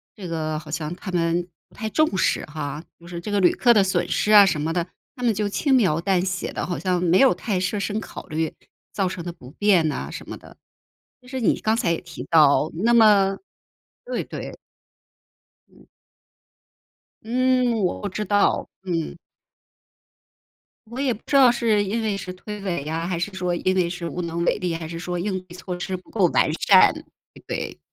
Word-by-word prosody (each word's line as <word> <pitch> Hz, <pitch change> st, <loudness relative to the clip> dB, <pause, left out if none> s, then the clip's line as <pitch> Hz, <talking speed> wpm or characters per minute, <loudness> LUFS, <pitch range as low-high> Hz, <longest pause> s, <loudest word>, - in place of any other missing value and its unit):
这 190 Hz, -4 st, -8 dB
个 155 Hz, -2 st, -2 dB
好 155 Hz, -, -13 dB
像 155 Hz, +1 st, -3 dB
他 185 Hz, -, -8 dB
们 170 Hz, 0 st, 0 dB, 0.2 s
不 -, -, -28 dB
太 220 Hz, -, -4 dB
重 310 Hz, -4 st, +1 dB
视 -, -, +1 dB
哈。 150 Hz, 0 st, -6 dB, 0.2 s
“就 170 Hz, -, -15 dB
是 175 Hz, -1 st, -6 dB
这 205 Hz, +5 st, -6 dB
个 205 Hz, -, +2 dB
旅 180 Hz, -, +5 dB
客 240 Hz, -1 st, +5 dB
的 205 Hz, -, +5 dB
损 190 Hz, -, 0 dB
失 215 Hz, -, 0 dB
啊 205 Hz, -1 st, +9 dB
什 155 Hz, -5 st, 0 dB
么 160 Hz, +2 st, -1 dB
的， 170 Hz, 0 st, -1 dB, 0.3 s
他 250 Hz, -, -8 dB
们 235 Hz, -, +3 dB
就 205 Hz, 0 st, -1 dB
轻 275 Hz, +6 st, 0 dB
描 185 Hz, -11 st, +3 dB
淡 185 Hz, 0 st, +1 dB
写 185 Hz, -1 st, -3 dB
的， -, -, -3 dB
好 175 Hz, -, -2 dB
像 180 Hz, -2 st, 0 dB
没 180 Hz, +1 st, +3 dB
有 270 Hz, -, +6 dB
太 200 Hz, -5 st, -2 dB
设 185 Hz, +3 st, -1 dB
身 210 Hz, +2 st, -2 dB
考 185 Hz, -, -9 dB
虑， 160 Hz, -1 st, -2 dB, 0.4 s
造 195 Hz, -2 st, 0 dB
成 180 Hz, -2 st, -5 dB
的 175 Hz, -, -5 dB
不 125 Hz, -7 st, -14 dB
便 185 Hz, -3 st, +3 dB
呐 -, -, -3 dB
什 -, -, -9 dB
么 -, -, -6 dB
的。 -, -, -16 dB, 0.7 s
就 250 Hz, -, -19 dB
是 260 Hz, 0 st, -4 dB
你 -, -, +1 dB
刚 220 Hz, +1 st, +1 dB
才 170 Hz, -7 st, +1 dB
也 -, -, -2 dB
提 175 Hz, -1 st, -9 dB
到， 155 Hz, -1 st, +5 dB
那 225 Hz, +8 st, +2 dB
么 205 Hz, -4 st, +5 dB, 0.7 s
对 -, -, -3 dB
对。 -, -, -8 dB, 1.1 s
嗯。 -, -, -22 dB, 1.3 s
嗯， 255 Hz, +1 st, +2 dB
我 180 Hz, -, -1 dB
不 205 Hz, -, -3 dB
知 210 Hz, +3 st, -3 dB
道， 205 Hz, +1 st, +2 dB
嗯。 170 Hz, -3 st, -3 dB, 1.7 s
我 235 Hz, +4 st, -8 dB
也 265 Hz, -4 st, +1 dB
不 220 Hz, -, -12 dB
知 280 Hz, -, -2 dB
道 260 Hz, -3 st, +7 dB
是 225 Hz, -4 st, +1 dB
因 215 Hz, +4 st, -2 dB
为 210 Hz, -2 st, -1 dB
是 180 Hz, -1 st, -6 dB
推 210 Hz, +3 st, -8 dB
诿 180 Hz, -7 st, -2 dB
呀， 165 Hz, +2 st, -3 dB
还 180 Hz, -2 st, -2 dB
是 185 Hz, +4 st, -2 dB
说 180 Hz, -1 st, -2 dB
因 185 Hz, +2 st, 0 dB
为 180 Hz, -2 st, +2 dB
是 175 Hz, -1 st, -5 dB
无 180 Hz, -, -4 dB
能 170 Hz, 0 st, -3 dB
为 -, -, +2 dB
力， 180 Hz, -4 st, -2 dB
还 165 Hz, -1 st, -6 dB
是 165 Hz, -, -6 dB
说 175 Hz, +1 st, -4 dB
应 190 Hz, +1 st, -2 dB
对 175 Hz, -1 st, -14 dB
措 180 Hz, -1 st, -6 dB
施 185 Hz, +1 st, -3 dB
不 180 Hz, -, -19 dB
够 200 Hz, -5 st, +2 dB
完 155 Hz, -, +2 dB
善， 185 Hz, +3 st, +6 dB
对 315 Hz, 0 st, -16 dB
不 -, -, -46 dB
对。 -, -, -4 dB
185 Hz, 225 characters per minute, -23 LUFS, 170-210 Hz, 1.7 s, 啊